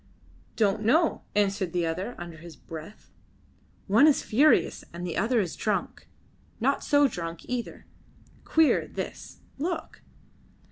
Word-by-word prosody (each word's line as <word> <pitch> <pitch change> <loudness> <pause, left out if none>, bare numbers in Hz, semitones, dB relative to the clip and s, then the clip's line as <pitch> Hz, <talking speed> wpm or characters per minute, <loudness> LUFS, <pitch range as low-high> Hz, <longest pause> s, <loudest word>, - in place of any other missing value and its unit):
"Don't 210 -1 +2
know," 305 +10 +2
answered 195 -3 +1
the 175 -1 +1
other, 185 +9 -3
under 170 -2 -8
his 170 +1 -11
breath. 165 +6 -11 0.7
"One 225 +10 +5
is 300 - +3
furious, 280 +8 +3
and 175 +1 -6
the 175 - -4
other 235 +1 +2
is 180 -6 -2
drunk. 210 -2 -2 0.5
Not - - +1
so 285 -1 +4
drunk, 170 -7 -6
either. 245 -1 -5 0.6
Queer, 320 -1 +3
this. - - -7 0.2
Look!" 340 +4 -4
205 Hz, 130 wpm, -27 LUFS, 175-255 Hz, 0.7 s, One